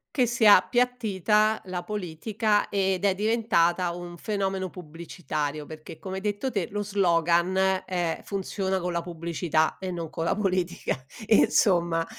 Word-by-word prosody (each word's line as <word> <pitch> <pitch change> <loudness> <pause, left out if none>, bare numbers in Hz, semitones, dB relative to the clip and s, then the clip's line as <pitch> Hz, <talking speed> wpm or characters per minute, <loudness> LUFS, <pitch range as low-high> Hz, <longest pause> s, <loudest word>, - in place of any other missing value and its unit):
Che 250 -3 +3
sia 220 -5 +7
appiattita 215 -2 +1
la 180 -1 -4
politica 210 +2 -1
ed 190 -1 0
è 195 -2 +3
diventata 190 -5 +1
un 175 0 -8
fenomeno 195 -2 -2
pubblicitario, 155 -3 -5
perché 155 0 -10
come 190 0 -6
hai - - -5
detto 210 +5 -2
te, 195 -6 -1
lo 205 +1 -3
slogan, 185 0 +2
eh, 175 -3 -2
funziona 190 -1 -2
con 180 0 -3
la 170 0 -1
pubblicità 165 -2 -1
e 190 -1 -4
no 165 -3 -5
co' 165 - -5
la 165 - +1
politica 185 -9 -1 0.2
e 215 - +5
insomma. 170 -4 +3
185 Hz, 150 wpm, -26 LUFS, 170-205 Hz, 0.2 s, sia